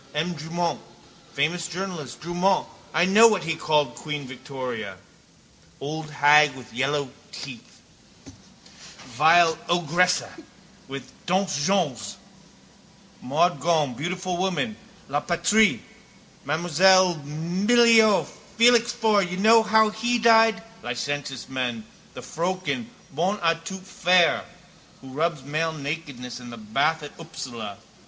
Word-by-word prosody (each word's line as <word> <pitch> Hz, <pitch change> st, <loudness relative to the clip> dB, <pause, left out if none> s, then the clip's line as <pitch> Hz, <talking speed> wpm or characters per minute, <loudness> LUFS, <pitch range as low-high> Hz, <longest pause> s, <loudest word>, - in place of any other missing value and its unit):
M. 165 Hz, +4 st, -1 dB
Drumont, 165 Hz, +2 st, -3 dB, 0.5 s
famous 160 Hz, +4 st, -1 dB
journalist, 175 Hz, -7 st, -6 dB
Drumont, 175 Hz, +3 st, 0 dB, 0.4 s
know 210 Hz, +5 st, +7 dB
what 210 Hz, -5 st, 0 dB
he 165 Hz, -, -1 dB
called 150 Hz, -2 st, 0 dB
queen 150 Hz, -2 st, -6 dB
Victoria? 125 Hz, -6 st, -7 dB, 0.8 s
Old 155 Hz, +2 st, -6 dB
hag 150 Hz, -1 st, +5 dB
with 125 Hz, -4 st, -13 dB
the -, -, -12 dB
yellow 140 Hz, 0 st, -1 dB, 0.2 s
teeth. 130 Hz, -4 st, -10 dB, 1.3 s
Vieille 160 Hz, +4 st, +5 dB
ogresse 175 Hz, +1 st, +2 dB, 0.6 s
with 135 Hz, -1 st, -7 dB
the -, -, -21 dB
dents 185 Hz, -4 st, 0 dB
jaunes. 145 Hz, -, -1 dB, 1.0 s
Maud 165 Hz, +7 st, +1 dB
Gonne, 155 Hz, -6 st, +1 dB
beautiful 180 Hz, +5 st, -4 dB
woman, 190 Hz, +5 st, -1 dB, 0.3 s
La 145 Hz, +2 st, -1 dB
Patrie, 180 Hz, +6 st, +2 dB, 0.7 s
M. 155 Hz, +3 st, -1 dB
Millevoye, 185 Hz, +6 st, +4 dB, 0.3 s
Félix 235 Hz, 0 st, +5 dB
Faure, 220 Hz, -4 st, +1 dB
know 225 Hz, +3 st, +6 dB
how 220 Hz, 0 st, +3 dB
he 240 Hz, +3 st, -1 dB
died? 225 Hz, -1 st, +4 dB, 0.2 s
Licentious 145 Hz, -, -4 dB
men. 125 Hz, -4 st, -3 dB, 0.3 s
The -, -, -8 dB
froeken, 185 Hz, +7 st, -3 dB, 0.2 s
bonne 180 Hz, +8 st, -1 dB
à 165 Hz, -3 st, 0 dB
tout 190 Hz, +2 st, -7 dB
faire, 180 Hz, -3 st, +2 dB, 0.6 s
who 135 Hz, -, -12 dB
rubs 155 Hz, +1 st, -2 dB
male 155 Hz, +3 st, -2 dB
nakedness 140 Hz, -5 st, -6 dB
in 120 Hz, -1 st, -10 dB
the 115 Hz, -, -9 dB
bath 140 Hz, +9 st, -1 dB
at 145 Hz, -, -8 dB
Upsala. 120 Hz, -10 st, -8 dB
165 Hz, 115 wpm, -24 LUFS, 140-190 Hz, 1.3 s, know